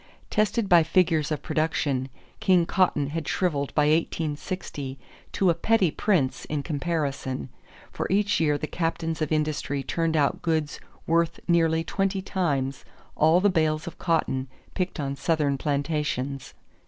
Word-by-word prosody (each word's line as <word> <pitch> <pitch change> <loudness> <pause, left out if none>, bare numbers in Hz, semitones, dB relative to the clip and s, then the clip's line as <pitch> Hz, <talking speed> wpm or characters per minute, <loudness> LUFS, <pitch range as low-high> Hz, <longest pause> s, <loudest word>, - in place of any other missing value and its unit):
Tested 215 +1 +1
by 175 -2 +7
figures 160 -2 +2
of 150 - -2
production, 145 -4 0 0.3
King 185 -5 +4
Cotton 155 -6 +1
had 160 -1 -4
shriveled 145 -7 0
by 150 - +4
1860 150 -2 -2 0.4
to 190 -3 +3
a - - +2
petty 200 -2 +2
prince 165 -11 0
in 150 -2 -3
comparison, 140 -4 -2 0.4
for - - -3
each 205 +2 +2
year 150 -2 +2
the 155 - -3
captains 165 0 -2
of 155 - -1
industry 150 -2 -1
turned 165 +1 0
out 145 -2 +1
goods 160 -3 -1 0.3
worth 165 0 +1
nearly 165 -2 +3
twenty 195 +3 -1
times 145 -9 -1 0.3
all 160 +3 +5
the 200 - +3
bales 155 -4 +1
of 170 - -8
cotton 135 -6 0 0.3
picked 185 -2 -2
on 140 -1 -2
Southern 150 -2 +1
plantations. 140 -2 -2
160 Hz, 140 wpm, -26 LUFS, 145-175 Hz, 0.4 s, by